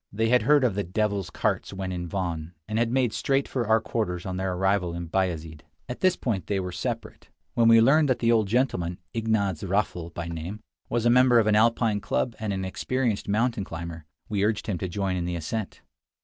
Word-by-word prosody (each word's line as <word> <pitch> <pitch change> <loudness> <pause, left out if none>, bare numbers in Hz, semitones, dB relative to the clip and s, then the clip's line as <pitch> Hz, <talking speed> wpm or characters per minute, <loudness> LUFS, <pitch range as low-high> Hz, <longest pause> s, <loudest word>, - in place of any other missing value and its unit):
They 110 +2 0
had 125 +1 +5
heard 145 +4 +4
of 120 -5 +2
the 100 +1 -1
"devil's 100 +1 -1
carts" - - -1
when 95 -1 -4
in 90 -1 -4
Van, 85 -3 -4
and 110 +1 -1
had 120 0 +2
made 125 -3 +1
straight 135 +3 +1
for 120 -4 -2
our 110 +1 +5
quarters 90 -6 -3
on 95 -1 -3
their 95 0 -1
arrival 95 -1 +1
in 85 0 -4
Bayazid. 80 -4 -2 0.3
At 125 - -6
this 185 -1 +3
point 100 -9 -2
they 100 -1 0
were 90 -1 -4
to - - -7
separate. - - -5 0.2
When 115 -1 +3
we 115 0 +8
learned 145 +5 +5
that 130 - +2
the 115 0 +2
old 110 -3 +3
gentleman 95 -7 0 0.2
(Ignaz 110 -6 0
Raffl 95 -3 -1
by 85 0 -5
name) 85 +5 -5 0.3
was 120 -1 0
a 120 - +5
member 125 0 +6
of 115 - +4
an 110 -1 +3
Alpine 110 -1 +3
club 120 +2 -1
and 110 -2 -2
an 95 -1 -2
experienced 120 +3 -1
mountain 110 +1 +1
climber, 85 -2 -7 0.2
we 100 -1 -1
urged 105 0 0
him 95 -5 -2
to 95 - -2
join 95 0 -1
in 85 - -2
the 90 0 -2
ascent. 95 +6 -4
100 Hz, 220 wpm, -26 LUFS, 90-115 Hz, 0.3 s, we